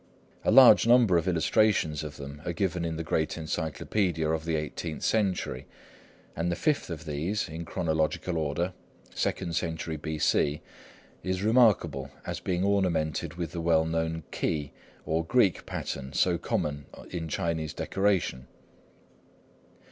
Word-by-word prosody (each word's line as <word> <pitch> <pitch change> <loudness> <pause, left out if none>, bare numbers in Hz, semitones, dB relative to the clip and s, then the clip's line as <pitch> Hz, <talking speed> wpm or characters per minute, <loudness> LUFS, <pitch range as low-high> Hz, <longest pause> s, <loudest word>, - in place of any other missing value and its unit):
A - - +1
large 125 0 +8
number 120 -6 +6
of 85 +2 +1
illustrations 85 -3 +2
of 75 -1 -7
them 70 +1 -8
are 85 - -3
given 90 0 -1
in 80 -1 -2
the 80 - -3
great 80 0 0
encyclopædia 80 +1 -1
of 80 0 -2
the 85 -1 0
eighteenth 75 +1 -4
century, 95 - 0 0.7
and 85 +2 -1
the - - 0
fifth 150 - 0
of 85 0 -6
these, 80 +8 -2
in 80 +2 -6
chronological 80 +2 -1
order, 80 +4 -1 0.4
second 85 -3 -2
century 80 -2 -2
B.C., 75 -1 0 0.6
is 95 +1 -2
remarkable 105 - +3 0.2
as - - -4
being 90 0 -1
ornamented 90 -7 0
with 85 -3 -4
the 85 - -4
well 80 -1 +3
known 80 0 -2
"key," 75 -3 -2 0.3
or 80 +1 0
Greek 100 -1 +2
pattern, 70 0 -5
so 85 +1 +2
common 75 -4 -2 0.2
in 85 -2 -4
Chinese 80 -1 -2
decoration. 95 -10 0
80 Hz, 140 wpm, -28 LUFS, 80-90 Hz, 0.7 s, large